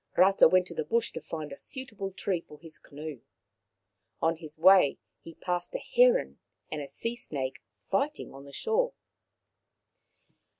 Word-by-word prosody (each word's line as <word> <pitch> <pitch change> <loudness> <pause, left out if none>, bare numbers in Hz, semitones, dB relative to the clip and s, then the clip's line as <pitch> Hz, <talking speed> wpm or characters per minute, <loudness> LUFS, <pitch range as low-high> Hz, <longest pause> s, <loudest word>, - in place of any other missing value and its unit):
Rata 195 +2 +7
went 185 +2 +4
to 175 - -5
the 155 - -2
bush 230 +9 +1
to - - -6
find 155 -3 -6
a 140 - -7
suitable 220 -8 -6
tree 190 -2 -2
for 150 - -14
his 165 0 -10
canoe. 150 -2 -8 1.0
On 165 0 +1
his 155 -2 -10
way 185 -3 +6 0.2
he 165 - -11
passed 180 - -3
a - - +2
heron - - +3 0.3
and 155 - -3
a 140 - -6
sea 230 +9 -4
snake 135 - -5 0.2
fighting 285 - -1
on 135 +1 -11
the 140 - -12
shore. 480 - 0
175 Hz, 160 wpm, -29 LUFS, 155-230 Hz, 1.0 s, Rata